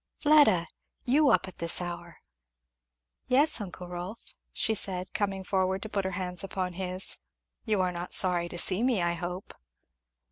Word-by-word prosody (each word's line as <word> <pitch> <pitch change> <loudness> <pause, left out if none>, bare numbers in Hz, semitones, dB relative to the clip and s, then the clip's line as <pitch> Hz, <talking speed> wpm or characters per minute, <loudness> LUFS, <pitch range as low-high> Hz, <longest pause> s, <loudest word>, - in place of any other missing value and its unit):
"Fleda! 290 - +5 0.4
you 280 +3 +4
up - - +3
at 185 - -12
this 170 -1 +3
hour!" 175 -1 -7 1.1
"Yes, 275 0 +3
uncle 180 -2 -7
Rolf," 180 +5 -7 0.2
she 220 - 0
said 185 -3 -2
coming 195 -2 -1
forward 190 0 0
to 220 - -6
put 200 -2 -2
her 190 - -2
hands 180 -1 -1
upon 185 -1 -3
his, 185 +1 -3 0.5
"you 215 -4 +1
are 180 -1 +1
not 175 0 -5
sorry 175 -2 +3
to 175 - -7
see 185 +4 +1
me, 240 -7 +2
I 170 0 +1
hope." 175 +2 -6
185 Hz, 165 wpm, -29 LUFS, 180-210 Hz, 1.1 s, Fleda